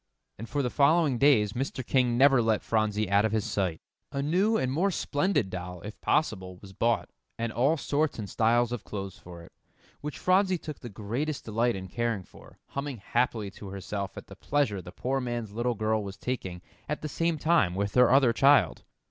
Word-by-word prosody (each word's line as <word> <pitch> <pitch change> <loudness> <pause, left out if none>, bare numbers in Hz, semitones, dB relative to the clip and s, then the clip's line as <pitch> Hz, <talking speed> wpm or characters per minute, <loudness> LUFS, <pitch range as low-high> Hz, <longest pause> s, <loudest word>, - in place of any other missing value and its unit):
And 115 - -7
for 145 +1 0
the 125 - -1
following 145 -3 +3
days, 110 -8 +4
Mr. 130 0 -3
King 125 -2 +2
never 135 -1 +6
let 110 -2 +1
Phronsie 110 -1 0
out 100 +1 +5
of 110 - +1
his 110 -1 0
sight. 95 -7 -1 0.3
A 140 -1 -2
new 190 +9 +2
and 130 - 0
more 175 +8 +2
splendid 145 - 0
doll, 90 -1 -6
if 105 +3 -9
possible, 95 -12 0
was 95 +1 -13
bought, 115 +4 0 0.3
and 115 -1 -3
all 140 +8 +2
sorts 150 +1 0
and 105 -3 -5
styles 120 +3 +2
of 120 -4 -4
clothes 95 -2 -6
for 85 -1 -11
it, - - -15 0.5
which 150 0 -5
Phronsie 185 0 +3
took 155 -3 -8
the 120 - -8
greatest 120 +9 -3
delight 115 +2 +1
in 95 -1 -6
caring 115 0 -2
for, - - -17
humming 140 -2 -4
happily 110 -1 -1
to 100 - -10
herself 100 0 -5
at - - -8
the - - -12
pleasure 135 -10 0
the 90 - -10
poor 135 +7 -2
man's 120 -4 -4
little 120 +3 -1
girl 110 0 0
was 100 0 -7
taking 95 -7 -4 0.3
at 150 - -3
the - - -1
same 165 +2 0
time 145 - +2
with 100 +1 -1
her 125 -1 +6
other 130 -2 +5
child. 140 +4 +4
120 Hz, 200 wpm, -28 LUFS, 100-140 Hz, 0.5 s, never